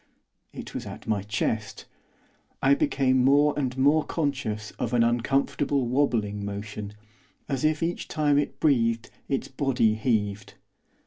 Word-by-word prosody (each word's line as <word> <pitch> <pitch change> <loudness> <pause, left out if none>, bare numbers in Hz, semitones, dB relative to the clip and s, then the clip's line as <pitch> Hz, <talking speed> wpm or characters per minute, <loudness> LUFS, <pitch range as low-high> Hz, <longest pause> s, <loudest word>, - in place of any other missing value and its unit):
It - - -9
was - - -5
at - - -9
my 105 -3 0
chest. 105 0 -3 0.7
I 135 +1 +4
became 130 -2 +2
more 145 +2 +4
and 130 -3 -2
more 145 +4 +4
conscious 135 -9 -2
of 120 +1 -1
an 115 - +4
uncomfortable 135 +3 +1
wobbling 115 -6 0
motion, 100 0 -6 0.5
as 140 0 -2
if 155 +1 +1
each 170 +1 -2
time 145 -2 +2
it 145 - -3
breathed 115 -6 +1 0.2
its 135 - -1
body 130 -5 +1
heaved. 110 -3 -1
125 Hz, 135 wpm, -26 LUFS, 110-140 Hz, 0.7 s, I